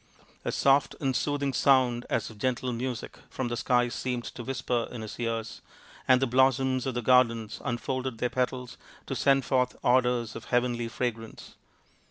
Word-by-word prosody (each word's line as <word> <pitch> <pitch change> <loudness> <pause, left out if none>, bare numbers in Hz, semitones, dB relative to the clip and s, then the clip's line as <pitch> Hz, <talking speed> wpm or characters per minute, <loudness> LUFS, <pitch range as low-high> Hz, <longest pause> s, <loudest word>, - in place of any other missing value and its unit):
A - - -1
soft 140 0 +3
and 135 -3 0
soothing 145 -1 0
sound 125 -2 +3
as - - -1
of 105 - -15
gentle 130 +1 -1
music 120 0 -5
from 130 -2 -3
the 120 - -2
skies 120 -1 +1
seemed 125 -2 -3
to 120 - -7
whisper 125 -2 -2
in 120 -3 -7
his 110 - -8
ears, 115 -1 -3 0.5
and 130 -1 +6
the 135 - +2
blossoms 130 +1 +2
of 130 - -2
the 120 - -2
garden 115 -3 +3
unfolded 130 0 -3
their 125 +2 -1
petals 125 -1 -2 0.3
to - - -4
send 135 -2 +3
forth 125 -1 +1
odours 125 -2 +2
of - - -8
heavenly 120 -1 0
fragrance. 115 -1 -5
125 Hz, 170 wpm, -28 LUFS, 120-130 Hz, 0.5 s, and